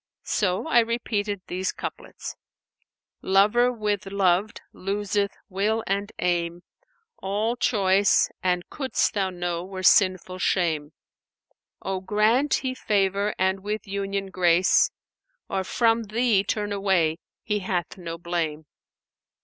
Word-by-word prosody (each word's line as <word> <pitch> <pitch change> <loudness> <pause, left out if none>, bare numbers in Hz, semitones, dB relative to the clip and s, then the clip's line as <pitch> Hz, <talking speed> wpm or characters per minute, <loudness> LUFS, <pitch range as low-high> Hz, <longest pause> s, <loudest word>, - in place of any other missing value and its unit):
So 190 - 0
I 275 -7 +5
repeated 215 -4 -1
these 185 +1 -2
couplets, - - -7 0.9
'Lover 210 +6 +4
with 210 -3 -2
loved[FN#498] 195 +1 +1 0.2
loseth 200 +1 -1 0.2
will 210 +3 0
and 200 +2 -1
aim! 175 0 -1 0.3
* 470 -2 -46
All 210 +5 -1
choice 200 -4 +3
(an 180 -1 +1
couldst 265 -3 0
thou 195 -2 0
know) 175 -1 -3
were 185 0 -7
sinful 185 -1 +3
shame. 160 -6 0 0.9
Or 190 -1 -2
grant 220 +8 +2
He 255 - 0
favour 200 -3 0
and 190 +1 +1
with 210 +2 -4
union 195 0 -3
grace, 180 0 +4 0.3
* - - -50
Or 190 - 0
from 230 +3 +2
thee 215 -2 +2
turn 205 0 -2
away, 190 -5 +1 0.2
He 210 -1 -1
hath 180 -3 -2
no 170 -3 -6
blame. 165 -3 -3
195 Hz, 125 wpm, -25 LUFS, 185-215 Hz, 0.9 s, I